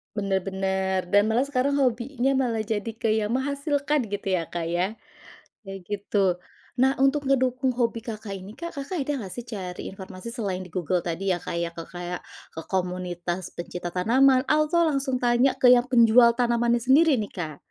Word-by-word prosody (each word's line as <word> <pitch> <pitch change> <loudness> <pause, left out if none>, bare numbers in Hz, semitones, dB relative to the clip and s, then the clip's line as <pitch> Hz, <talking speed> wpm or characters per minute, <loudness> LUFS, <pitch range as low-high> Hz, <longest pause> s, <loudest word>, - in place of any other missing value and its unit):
Benar 195 -2 0
benar. 190 0 -1
Dan 205 +1 +5
malah 225 +4 +2
sekarang 280 0 0
hobinya 255 +1 0
malah 230 -4 0
jadi 215 0 -3
ke 225 -1 0
yang 215 0 0
menghasilkan, 285 0 0
gitu 200 0 -5
ya 170 -3 0
Kak 170 -1 -4
ya. 180 +5 -1 0.7
Kayak 195 0 -7
gitu. 205 -1 0 0.5
Nah, 265 +1 +4
untuk 275 +2 +3
ngedukung 260 -1 +1
hobi 235 -2 -1
Kakak 215 -3 -6
ini 190 +2 -10
Kak, 340 +8 -8
Kakak 285 +5 -4
ada 285 +2 -1
nggak 185 - -7
sih, 240 - -6
cari 185 -5 -6
informasi, 190 +2 -9
selain 205 -6 -3
di 185 - -8
Google 180 0 -1
tadi 175 +3 -2
ya 175 - -2
Kak - - -5
ya. 170 0 -1
Ke 170 - -7
kayak 175 0 -5 0.3
ke 160 - -7
komunitas 180 -1 -3
pencinta 175 0 -5
tanaman, 255 +9 +3
atau 305 +3 +2
langsung 275 -4 0
tanya 245 +1 +2
ke 250 -1 +6
yang 245 0 +4
penjual 235 -1 +6
tanamannya 240 -1 +2
sendiri 285 +3 +5
nih, 210 -3 -4
Kak? 160 -5 -5
225 Hz, 180 wpm, -25 LUFS, 190-260 Hz, 0.7 s, ke